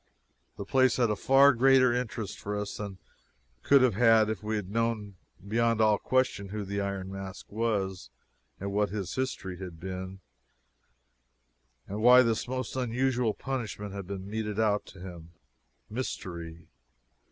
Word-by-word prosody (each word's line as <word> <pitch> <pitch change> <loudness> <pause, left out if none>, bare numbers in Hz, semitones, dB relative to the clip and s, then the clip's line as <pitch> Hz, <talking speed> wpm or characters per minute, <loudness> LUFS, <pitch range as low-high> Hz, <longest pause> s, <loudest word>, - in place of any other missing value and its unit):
The 100 - -5
place 130 +3 +3
had 120 -3 +2
a - - +1
far 135 +4 +5
greater 130 0 +5
interest 115 -4 -3
for 105 0 -4
us 105 0 -4
than 100 -2 -5
it - - -16 0.6
could 140 - +5
have 125 -4 +4
had 110 0 +4
if 110 - -5
we 110 +1 -2
had 105 -3 -3
known 115 -2 -1 0.3
beyond 115 +1 +1
all 110 -2 +4
question 130 -6 0
who 105 0 -4
the 100 +1 -2
Iron 100 -1 -4
Mask 95 -1 -8
was, 100 - -2 0.5
and 100 +1 -4
what 105 0 +1
his 95 -2 -4
history 95 -8 -3
had 90 -4 -8
been, 95 +1 -6 1.7
and 105 +2 -4
why 125 +2 +8
this 115 -1 0
most 130 -1 -4
unusual 125 -2 0
punishment 110 -6 -4
had 100 -2 -6
been 95 -1 -6
meted 105 0 -3
out 105 -2 +1
to 95 - -13
him. 85 -3 -10 0.5
Mystery! 85 -8 -6
105 Hz, 155 wpm, -29 LUFS, 95-120 Hz, 1.7 s, why